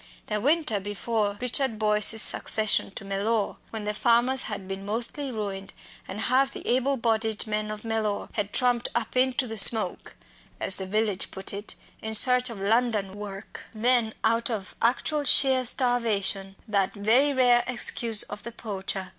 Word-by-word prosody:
the 210 -1 -3
winter 290 -5 +1
before 205 +1 -3
Richard 250 -1 0
Boyce's 210 0 +2
succession 215 -1 +1
to 195 - -9
Mellor 200 +2 -2
when 220 -2 -6
the 210 0 -2
farmers 240 +4 +2
had 200 -3 -7
been 195 0 -6
mostly 235 +7 -1
ruined, 200 -3 -6 0.3
and 195 +3 -6
half 265 +3 +1
the - - -9
able 260 +3 +1
bodied 225 -2 -1
men 215 -1 -3
of 215 +1 -7
Mellor 220 -2 -2
had 205 -2 -3
tramped 245 -1 0
"up 235 - -3
into 255 +1 +1
the 225 -2 -2
smoke," 220 +2 +5 0.4
as 190 - 0
the 190 - -5
village 210 -1 -1
put 190 +1 -4
it, 205 +2 -7 0.3
in 220 0 -1
search 250 +2 +4
of 225 -4 -8
London 215 -1 0
work 205 0 -9
then, 235 0 +1
out 230 +1 +1
of 210 -4 -5
actual 290 +5 0
sheer 265 -2 +4
starvation 220 -6 +1
that 200 -2 0
very 235 +8 +3
rare 245 -3 +3
excuse 235 -3 +1
of 205 0 -9
the 235 - -8
poacher! 195 -4 -5
220 Hz, 165 wpm, -25 LUFS, 205-245 Hz, 0.4 s, smoke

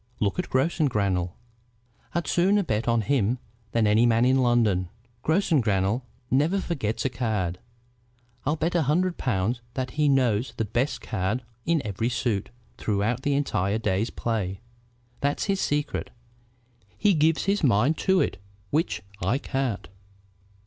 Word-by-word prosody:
Look 105 - 0
at 180 - -2
Grossengrannel. 105 - +1 0.8
I'd 170 - 0
sooner 195 +4 +3
bet 110 - -1
on 115 -1 +3
him 120 0 +1 0.3
than 115 -1 +2
any 110 +3 +4
man 115 +1 +4
in 130 +1 +4
London. 110 -8 +2 0.3
Grossengrannel 120 - +2 0.3
never 150 +9 +3
forgets 135 - -2
a - - +3
card. 110 -8 -2 0.8
I'll 150 +3 +1
bet 160 +2 -1
a 175 - +3
hundred 170 +5 +1
pounds 115 0 0
that 130 -2 -2
he 150 +1 +2
knows 125 -4 +2
the 110 - 0
best 120 +7 -1
card 100 +7 -2 0.2
in 165 -4 +2
every 105 +3 -1
suit 115 -5 -1 0.3
throughout 110 +4 0
the 140 +1 +1
entire 105 -8 0
day's 105 -1 0
play. 100 -5 -2 0.6
That's 140 +1 0
his 195 -1 0
secret. 145 +1 -1 0.9
He 205 -2 +4
gives 160 0 +3
his 200 -1 +1
mind 125 +4 +4
to 190 -1 +3
it, - - -1 0.3
which 160 +4 0 0.2
I 105 +9 +1
can't. 135 -5 -2
125 Hz, 140 wpm, -26 LUFS, 105-150 Hz, 0.9 s, any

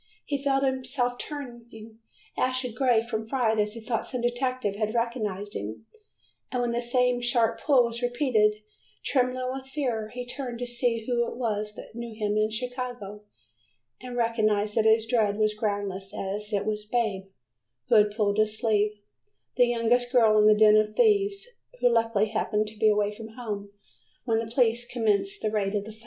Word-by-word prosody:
He 285 -2 -2
felt 275 -1 +1
himself 255 -2 -1
turning 235 -6 -9 0.4
ashen 255 -2 -1
gray 245 -2 +2
from 225 -2 -3
fright 225 -2 0
as 210 +1 0
he - - -6
thought 225 0 -2
some 250 - -3
detective 240 -3 -1
had 215 +2 -2
recognized 215 -4 -2
him, 105 - -6 0.7
and 250 - -1
when 240 -1 0
the 235 +1 -1
same 245 0 +1
sharp 235 -2 +1
pull 275 -4 +5
was 235 0 -4
repeated, 240 -4 +1 0.4
trembling 255 -1 0
with 265 0 -7
fear, 245 -7 -2
he 245 0 -6
turned 245 -1 -6
to 245 - -4
see 240 -2 -1
who 235 -1 0
it - - -6
was 210 -3 -2
that - - -11
knew 235 -1 -7
him 210 -1 -1
in 215 0 +2
Chicago, 245 -3 -5 0.8
and 250 -1 -7
recognized 215 -3 +1
that 220 0 +2
his 220 0 +4
dread 220 -3 +1
was 215 -1 +2
groundless 200 -2 -3
as 205 +2 -4
it 205 -1 0
was 210 -1 -2
"Babe" 210 -4 -1 0.6
who - - +2
had 210 -1 +6
pulled 205 -1 0
his 215 0 +2
sleeve, 210 -2 +2 0.6
the 245 -1 +5
youngest 240 +1 +1
girl 225 -4 +5
in 210 - +6
the 215 0 +6
den 215 0 +7
of 215 0 +3
the 210 - -17
thieves, 405 - +2 0.3
who - - +4
luckily 225 -2 +2
happened 215 0 0
to 215 0 -16
be 220 - +5
away 210 -1 +2
from 220 +1 -10
home 205 -5 -5 0.6
when 225 -3 +1
the 225 0 -4
police 240 -1 +2
commenced 240 - -1
the 215 - 0
raid 205 -1 -1
of 205 -1 -1
the 220 - -8
flat. 215 - -16
225 Hz, 185 wpm, -27 LUFS, 215-245 Hz, 0.8 s, den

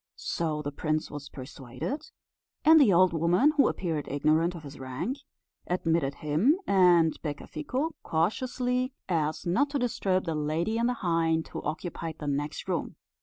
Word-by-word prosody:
So 155 -3 -2
the 145 - -3
prince 155 +1 -2
was 145 -1 -7
persuaded; 135 - -6 0.6
and 320 0 +8
the 240 -8 +6
old 185 0 +5
woman, 175 - +3
who 285 - +5
appeared 160 -5 -2
ignorant 155 +5 +1
of 165 - -9
his 140 -1 -10
rank, 130 - -4 0.5
admitted 165 -5 0
him 160 - +2
and 175 -4 +5
Becafico 160 - -3
cautiously, 250 +9 0
so 260 - -26 0.2
as 155 -1 -1
not 245 +12 +2
to 285 - -1
disturb 200 -7 0
the 165 - -1
lady 160 +8 -1
and 235 +1 +2
the 250 - -1
hind, 165 -1 +1
who - - -5
occupied 160 0 -4
the 150 - -7
next 145 +1 -3
room. - - -2
165 Hz, 160 wpm, -28 LUFS, 150-220 Hz, 0.6 s, and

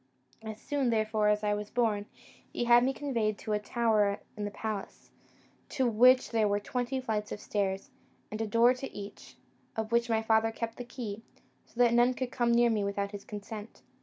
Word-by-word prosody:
As 220 -1 -7
soon, 280 -2 -1
therefore, 215 -1 +1
as 210 0 +2
I 210 0 +2
was 205 0 -4
born, 215 -4 0 0.4
he - - -2
had 240 0 +6
me 260 - +2
conveyed 235 -7 -1
to 215 - -4
a 210 - +1
tower 210 -2 +1 0.2
in 210 -1 -4
the - - -2
palace, 205 -1 -6 0.6
to 260 -2 +1
which 250 +3 +5
there 220 -2 +2
were 205 0 +1
twenty 250 +4 -2
flights 215 -4 -3
of - - -4
stairs, 200 +5 -2 0.4
and 215 +1 -4
a 225 - -1
door 230 +4 +5
to 260 +1 -7
each, 200 0 -10 0.4
of 220 0 -3
which 235 0 +2
my 225 -1 +1
father 220 0 +3
kept 230 0 -5
the 245 - -5
key, 225 -4 -6 0.5
so - - -26
that 240 -1 +4
none 240 +1 +4
came 245 -2 0
near 235 0 +4
me 215 -2 0
without 200 0 -2
his 205 -1 -8
consent. 210 +1 -8
220 Hz, 195 wpm, -30 LUFS, 210-240 Hz, 0.6 s, had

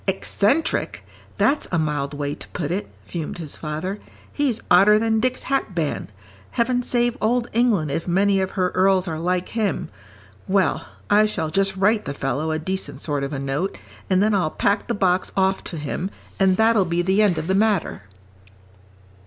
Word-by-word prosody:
"Eccentric? 205 - 0 0.3
That's 290 +2 +2
a 175 - +1
mild 150 -2 -1
way 145 0 -2
to - - -10
put 160 -3 -4
it," 195 +3 -2 0.2
fumed 165 -2 -5
his 160 -4 -5
father. 160 +6 -4 0.3
"He's 270 -6 0
odder 200 +4 +7
than 220 0 +1
Dick's 255 +2 -1
hatband. 185 - -1 0.4
Heaven 245 +1 +1
save 240 -1 +1
Old 240 +2 +1
England 215 - +2
if 165 - -3
many 195 +2 +3
of 190 - -1
her 185 -1 +1
earls 190 0 +3
are 160 -2 -3
like 180 +2 -1
him. 215 -5 -1 0.6
Well, 195 0 +1 0.2
I 210 +1 +6
shall 160 -7 -3
just 195 +2 +1
write 210 +3 +2
the 140 - -4
fellow 140 +4 -2
a 155 - 0
decent 190 +4 -4
sort 145 -3 -2
of 140 - -3
a 145 - -3
note, 140 +8 -2 0.3
and 190 +1 +3
then 215 0 +2
I'll 185 -6 +2
pack 200 +6 0
the - - -1
box 185 -2 +1
off 190 0 +2
to 170 - -5
him, 150 +5 -3 0.3
and 190 -1 +4
that'll 220 -3 +4
be 175 0 0
the 190 +3 +2
end 195 -6 +3
of - - -2
the 190 - 0
matter." 205 -2 +1
190 Hz, 180 wpm, -22 LUFS, 160-210 Hz, 0.6 s, odder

